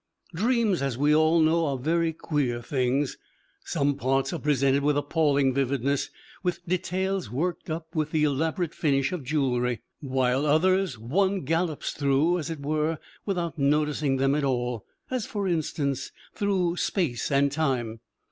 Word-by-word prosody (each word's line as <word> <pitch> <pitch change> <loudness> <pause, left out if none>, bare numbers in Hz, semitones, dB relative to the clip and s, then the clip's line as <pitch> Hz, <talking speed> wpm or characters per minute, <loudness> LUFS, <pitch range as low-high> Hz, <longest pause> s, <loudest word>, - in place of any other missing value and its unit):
Dreams, 220 - +1
as 135 -4 -1
we 145 +2 +3
all 160 +2 +4
know, 160 +1 +3
are 140 -2 -1
very 165 +5 +1
queer 145 -6 -1
things: 130 +2 -1 0.4
some 145 -3 0
parts 135 +4 0
are 170 - -3
presented 140 -1 +2
with 145 0 +2
appalling 145 -2 +2
vividness, 140 +1 0 0.3
with 180 -1 -2
details 185 - -1
worked 165 +11 -2
up 160 +1 -5
with 155 -3 0
the 155 -1 +1
elaborate 160 +3 0
finish 140 -3 +1
of 180 -6 -4
jewellery, 125 -4 0 0.2
while 130 0 0
others 185 0 +2
one 190 - 0
gallops 165 +2 -1
through, 145 +5 +2
as 155 - -4
it 160 -3 -5
were, 155 +2 0 0.3
without 175 -5 -2
noticing 150 -1 +1
them 135 +1 +2
at 150 0 0
all, 125 -4 -1 0.3
as, 255 -4 -2
for 205 -3 -2
instance, 145 -5 -1 0.2
through 185 -4 0
space 160 - -1
and 140 0 +3
time. 130 -7 -1
150 Hz, 150 wpm, -26 LUFS, 135-170 Hz, 0.4 s, all